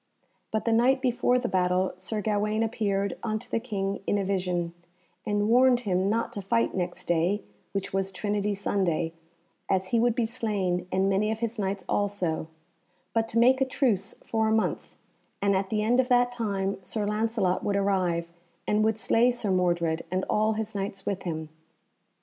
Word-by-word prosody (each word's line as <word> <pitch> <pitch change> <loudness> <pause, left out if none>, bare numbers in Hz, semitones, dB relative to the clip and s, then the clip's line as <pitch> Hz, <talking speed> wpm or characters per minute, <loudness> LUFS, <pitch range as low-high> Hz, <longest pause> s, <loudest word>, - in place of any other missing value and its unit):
But 220 - -2
the 230 - +2
night 250 +4 +4
before 250 -1 +2
the 245 -1 -1
battle 185 0 +1
Sir 210 +3 -3
Gawaine 215 +1 +1
appeared 200 -3 -1
unto 215 -2 -3
the - - -1
King 200 -4 -3
in 205 - +2
a 200 - -1
vision, 180 -3 -1 0.5
and 205 0 +1
warned 245 +1 +5
him 190 -3 +1
not 230 +2 0
to 200 - -4
fight 230 +4 +1
next 180 -1 -3
day, 175 +5 +1 0.3
which 195 -1 -3
was 195 0 0
Trinity 205 +1 -1
Sunday, 175 -5 0 0.6
as 190 -1 +1
he 230 - +2
would 235 0 +3
be 240 -3 +1
slain 200 -6 -1
and 190 +1 +2
many 200 +2 +2
of 220 +1 -4
his 230 -1 -2
Knights 195 -1 -2
also; 190 -6 -1 0.7
but 225 -1 +1
to 225 - -2
make 255 +3 +5
a - - +7
truce 235 -8 0
for 220 -1 +1
a - - +1
month, 220 0 -1 0.4
and 200 -1 +2
at 190 0 0
the 215 -1 0
end 240 +4 +3
of 255 - +3
that 245 -1 +3
time 200 -5 -2
Sir 215 -2 -2
Lancelot 210 -3 0
would 200 - 0
arrive, 185 -4 +1 0.4
and 210 +1 +2
would 220 0 +2
slay 230 +2 +3
Sir 235 -5 -1
Mordred, 170 -3 +1
and 185 +1 -1
all 215 +1 +2
his 220 0 -3
Knights 195 -1 -4
with 195 -2 -2
him. 160 -3 -4
205 Hz, 185 wpm, -27 LUFS, 190-225 Hz, 0.7 s, a